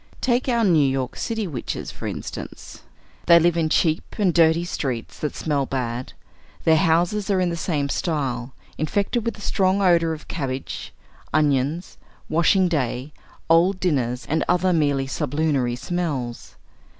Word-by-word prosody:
Take 250 Hz, +1 st, +1 dB
our 235 Hz, -2 st, +2 dB
New 175 Hz, -6 st, +4 dB
York 135 Hz, -2 st, -1 dB
city 225 Hz, -2 st, -2 dB
witches, 145 Hz, -9 st, -5 dB
for -, -, -7 dB
instance. -, -, -7 dB, 0.5 s
They 170 Hz, -1 st, +8 dB
live 170 Hz, 0 st, +3 dB
in 165 Hz, -2 st, +1 dB
cheap 160 Hz, 0 st, +1 dB
and 195 Hz, -5 st, +2 dB
dirty 165 Hz, 0 st, +4 dB
streets 130 Hz, -9 st, -4 dB
that 150 Hz, -, -3 dB
smell 145 Hz, -4 st, -1 dB
bad; 125 Hz, -1 st, -3 dB, 0.5 s
their 160 Hz, -, +5 dB
houses 175 Hz, +6 st, +2 dB
are 195 Hz, -2 st, +2 dB
in 180 Hz, -1 st, +1 dB
the -, -, -2 dB
same 155 Hz, -4 st, -1 dB
style, 135 Hz, -6 st, -2 dB, 0.2 s
infected 200 Hz, -, 0 dB
with 230 Hz, 0 st, -3 dB
a -, -, -12 dB
strong 190 Hz, -1 st, +1 dB
odor 170 Hz, -4 st, +3 dB
of 160 Hz, -1 st, -7 dB
cabbage, 135 Hz, -4 st, -4 dB, 0.4 s
onions, 150 Hz, +2 st, 0 dB, 0.3 s
washing 175 Hz, +3 st, +3 dB
day, 140 Hz, -3 st, -2 dB, 0.3 s
old 175 Hz, +4 st, +4 dB
dinners, 130 Hz, -8 st, 0 dB
and 160 Hz, -, +1 dB
other 180 Hz, +1 st, +3 dB
merely 145 Hz, -4 st, +1 dB
sublunary 140 Hz, -3 st, 0 dB
smells. 135 Hz, -6 st, -4 dB
160 Hz, 150 wpm, -23 LUFS, 135-180 Hz, 0.5 s, They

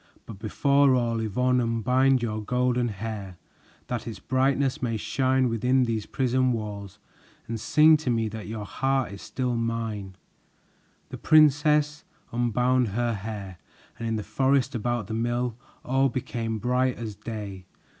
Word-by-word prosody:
But 105 Hz, -4 st, -10 dB
before 140 Hz, +5 st, +3 dB
all, 115 Hz, -2 st, 0 dB
Yvonne, 125 Hz, +4 st, +1 dB
unbind 125 Hz, +3 st, +2 dB
your 110 Hz, -2 st, -2 dB
golden 125 Hz, +2 st, +1 dB
hair 100 Hz, -3 st, -6 dB, 0.5 s
That 120 Hz, -1 st, -4 dB
its 115 Hz, -, -5 dB
brightness 135 Hz, +1 st, 0 dB
may 115 Hz, -3 st, -1 dB
shine 130 Hz, +2 st, +1 dB
within 125 Hz, +3 st, +2 dB
these 115 Hz, -3 st, -2 dB
prison 130 Hz, -1 st, +1 dB
walls, 100 Hz, -3 st, -6 dB, 0.5 s
And 115 Hz, -1 st, -4 dB
sing 155 Hz, +7 st, +5 dB
to 150 Hz, -4 st, -4 dB
me 115 Hz, -2 st, +1 dB
that 110 Hz, 0 st, -7 dB
your 110 Hz, -1 st, -5 dB
heart 135 Hz, +2 st, -1 dB
is 100 Hz, -, -9 dB
still 125 Hz, -2 st, -2 dB
mine." 115 Hz, -4 st, -3 dB, 0.9 s
The -, -, -8 dB
princess 150 Hz, 0 st, +4 dB, 0.3 s
unbound 125 Hz, +1 st, +1 dB
her 120 Hz, +3 st, -1 dB
hair, 100 Hz, -3 st, -6 dB, 0.4 s
and 115 Hz, -, -3 dB
in 115 Hz, -, 0 dB
the 105 Hz, -, -3 dB
forest 135 Hz, +5 st, +1 dB
about 120 Hz, -1 st, -1 dB
the 110 Hz, -, -6 dB
mill 120 Hz, +1 st, -1 dB, 0.3 s
all 135 Hz, +1 st, +2 dB
became 115 Hz, -3 st, -3 dB
bright 125 Hz, +2 st, +1 dB
as 115 Hz, -3 st, -5 dB
day. 100 Hz, -4 st, -7 dB
120 Hz, 145 wpm, -26 LUFS, 110-130 Hz, 0.9 s, sing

